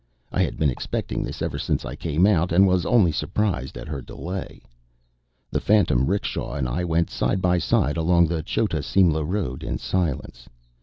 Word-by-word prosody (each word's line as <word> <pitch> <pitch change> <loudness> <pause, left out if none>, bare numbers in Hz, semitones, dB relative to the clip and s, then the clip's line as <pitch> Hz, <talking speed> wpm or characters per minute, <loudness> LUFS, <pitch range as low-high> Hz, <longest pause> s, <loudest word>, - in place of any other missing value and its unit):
I - - +1
had - - -1
been 75 -3 +2
expecting 60 - -3
this - - -4
ever - - -3
since - - -1
I 65 - -5
came 80 +3 +1
out; 90 -4 +3
and 95 +4 +6
was 90 -1 +2
only 110 -9 +4
surprised 85 - -2
at - - -8
her 70 -3 -4
delay. 90 +9 -7 0.9
The - - -1
phantom 95 - +3
'rickshaw 100 +2 -2
and 70 -3 -1
I 60 +8 -2
went 85 -1 0
side 95 - 0
by 90 -1 +2
side 75 -1 +1
along 85 +1 +4
the 85 0 -1
Chota 85 0 -1
Simla 80 +4 +2
road 80 -6 -3
in - - -3
silence. 85 -7 -3
85 Hz, 185 wpm, -24 LUFS, 75-95 Hz, 0.9 s, and